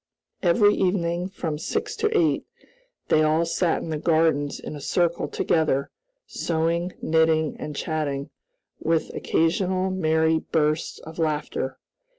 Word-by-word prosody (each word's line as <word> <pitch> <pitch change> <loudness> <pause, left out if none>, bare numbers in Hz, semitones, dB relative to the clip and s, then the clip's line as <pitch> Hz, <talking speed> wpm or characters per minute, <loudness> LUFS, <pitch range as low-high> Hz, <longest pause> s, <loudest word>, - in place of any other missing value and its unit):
Every 205 +3 +4
evening, 180 -2 0
from 160 -6 -4
six 425 - -2
to 435 -1 +1
eight, 335 -5 +1 0.6
they 155 - +4
all 155 +2 +3
sat 170 0 0
in 165 - -5
the 155 - -2
gardens 160 -3 +2
in - - -7
a 145 - -8
circle 170 +3 0
together, 155 -4 0 0.3
sewing, 170 +2 -1
knitting, 160 -1 +2
and 150 -1 -5
chatting, 145 -2 -2 0.5
with 160 0 0
occasional 185 +3 +1
merry 160 -3 +2
bursts 155 0 0
of 160 +2 -10
laughter. 150 -4 -1
160 Hz, 130 wpm, -24 LUFS, 155-175 Hz, 0.6 s, Every